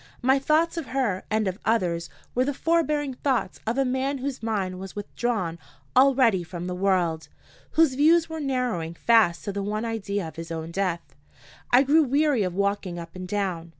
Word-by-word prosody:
My 265 +2 +4
thoughts 315 +5 +2
of 325 - -4
her 240 -9 -1
and 215 -1 +1
of 190 +2 -3
others 175 -7 0 0.2
were 250 - +2
the 280 +1 -2
forbearing 300 -4 +1
thoughts 260 -1 -1
of 230 +3 0
a 270 - +2
man 260 +2 -1
whose 270 0 -4
mind 195 -5 -2
was 190 0 -8
withdrawn 205 -4 -2 0.4
already 255 -7 +5
from 175 0 -7
the 180 - -3
world, 180 -4 0 0.5
whose 320 -4 +4
views 320 +5 +4
were 320 0 -6
narrowing 250 - -2
fast 175 -8 +3
to 200 - -4
the 200 - -2
one 210 +3 -2
idea 205 -5 -3
of 160 - -11
his 165 0 -6
own 165 0 -5
death. 175 -2 -2 0.6
I 250 +2 +6
grew 300 +4 +5
weary 285 -2 +2
of 180 -3 -1
walking 200 -2 -1
up 170 0 -9
and 185 0 -6
down. 180 -4 -2
220 Hz, 185 wpm, -25 LUFS, 180-270 Hz, 0.6 s, I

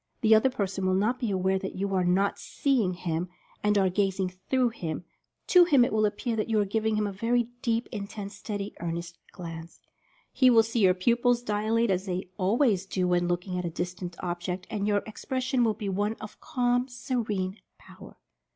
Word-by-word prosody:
The 220 -2 +5
other 220 +4 +5
person 195 -5 -2
will 185 - +2
not 220 +6 +1
be 235 - -1
aware 190 0 +1
that 190 - -5
you 195 +1 -2
are 185 -1 +2
not 185 +3 +1
"seeing" 245 -10 0
him, 170 0 -3 0.3
and 210 0 +2
are 195 -1 +4
"gazing 190 0 0 0.2
through" 255 -2 +3
him 170 -8 -5 0.2
— - - -53
to 360 -1 +9
him 280 -8 +5
it - - -3
will 215 -1 +3
appear 225 +3 -3
that 215 - -1
you 220 -1 +2
are 205 - +2
giving 220 +2 0
him 210 0 +1
a 205 - -2
very 230 +4 0
deep, 230 0 0
in 200 -3 -4
tense, 200 -1 -7
steady, 205 -2 -5
earnest 170 0 -5
glance. 165 -2 -8 0.5
He 255 -2 +5
will 230 -2 +6
see 225 +1 -2
your 185 -3 +5
pupils 240 +5 +2
dilate, 220 +1 +1
as 190 +1 -1
they 180 0 -3
always 200 -1 +2
do 185 -2 0
when 175 0 +2
looking 180 +1 -2
at 180 - -3
a - - -1
distant 175 +1 -5
object, 180 +1 -3
and 205 -2 -1
your 205 -1 +2
expression 255 +3 -1
will 220 -2 +2
be 210 -1 -5
one 205 +3 0
of 215 -1 -11
calm, 245 0 +1
se 245 +1 -6
rene 205 -5 -1 0.2
power. - - -14
205 Hz, 205 wpm, -28 LUFS, 185-230 Hz, 0.5 s, to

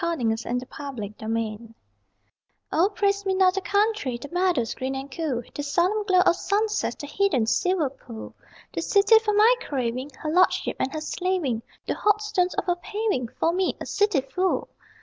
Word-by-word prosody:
O - - +2
PRAISE - - -8
ME 245 - -4
NOT 225 +2 0
THE 250 - -8
COUNTRY 225 -3 -5 1.0
O 360 +5 +3
praise 400 -1 0
me 385 -1 0
not 375 -1 +4
the 390 - -1
country 405 - 0
The 280 +4 -9
meadows 355 -10 +1
green 265 +1 -3
and 270 +1 -6
cool, 265 -5 -2
The - - -4
solemn 355 +9 +1
glow 370 -2 +4
of 345 - +4
sunsets, 420 +2 0
the - - -7
hidden 290 - +1
silver 330 +3 +1
pool! 235 -4 -10 0.4
The - - -2
city 410 +2 +5
for 425 -2 0
my 435 +4 +6
craving, 255 0 -2
Her 305 - -3
lordship 365 +3 +2
and 265 - 0
her 310 - -4
slaving, 315 -8 -1 0.2
The - - -1
hot 420 0 +2
stones 365 -3 0
of - - -1
her 355 -1 +1
paving 410 - -2
For 330 - +2
me, 370 0 0
a - - -5
city 405 -8 +2
fool! 360 +8 -1
340 Hz, 190 wpm, -25 LUFS, 255-395 Hz, 1.0 s, my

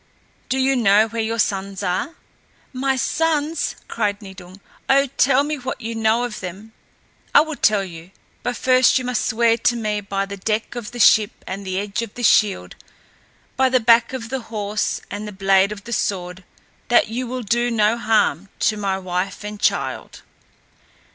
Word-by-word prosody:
Do 265 - 0
you 265 +1 +2
know 215 -2 +4
where 230 +1 -3
your 225 +1 -2
sons 195 -2 -1
are?" 185 - -2 0.6
"My 265 +1 0
sons!" 310 +3 0
cried 205 -3 -1
Nidung. 190 -2 -12 0.3
"Oh, 275 +1 +5
tell 275 +1 +4
me 300 +1 -3
what 260 -1 -5
you 230 -1 -5
know 225 +1 +1
of 240 -3 -4
them." 190 +4 -8 0.6
"I - - +9
will 315 0 -3
tell 215 -6 +2
you, 170 -2 -10 0.3
but 245 - -3
first 255 +1 +4
you 255 - -3
must 250 -1 -1
swear 230 0 +2
to 240 - +2
me 210 -2 -2
by 195 0 -2
the 200 0 -8
deck 215 +3 -2
of 240 -2 -6
the 245 - -10
ship 215 -1 +4
and 195 +2 -6
the 185 0 -2
edge 200 +2 -2
of 230 -3 -7
the 245 - -6
shield, 200 - +3 0.8
by 260 0 +3
the 255 0 +3
back 230 +1 +4
of 245 -3 -6
the 265 +1 -2
horse 210 -1 -2
and 210 +1 -5
the - - -6
blade 195 0 +2
of 205 -2 -7
the 235 - -6
sword 185 -3 -3 0.4
that 240 -2 +4
you 245 +3 -3
will 250 +1 -4
do 240 +3 +1
no 220 -1 +2
harm 215 -6 +1
to 215 - +2
my 195 -2 -1
wife 185 +1 -3
and 210 0 -7
child." - - -1
220 Hz, 185 wpm, -21 LUFS, 200-245 Hz, 0.8 s, I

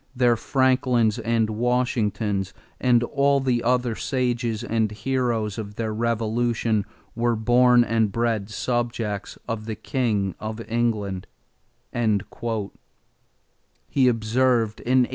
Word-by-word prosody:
"Their 120 -2 +4
Franklins 125 -3 +2
and 115 -1 +1
Washingtons 110 -4 0 0.2
and 120 -2 +3
all 140 +2 +2
the 125 -3 +1
other 125 0 +1
sages 120 -3 -1
and 110 -1 0
heroes 115 -2 -1
of 105 -1 -7
their 110 -1 -2
revolution 115 -1 0 0.3
were 120 0 +1
born 120 +2 +5
and 115 -3 +1
bred 115 -2 -1
subjects 115 -2 -2
of 115 -2 -4
the 110 - -3
king 105 -9 -1
of 110 +1 -5
England," 110 -5 -1 0.7
he 110 -3 +2 1.9
observed 115 -1 +1
in 125 - -3
1820. - - -3
115 Hz, 110 wpm, -24 LUFS, 110-125 Hz, 1.9 s, born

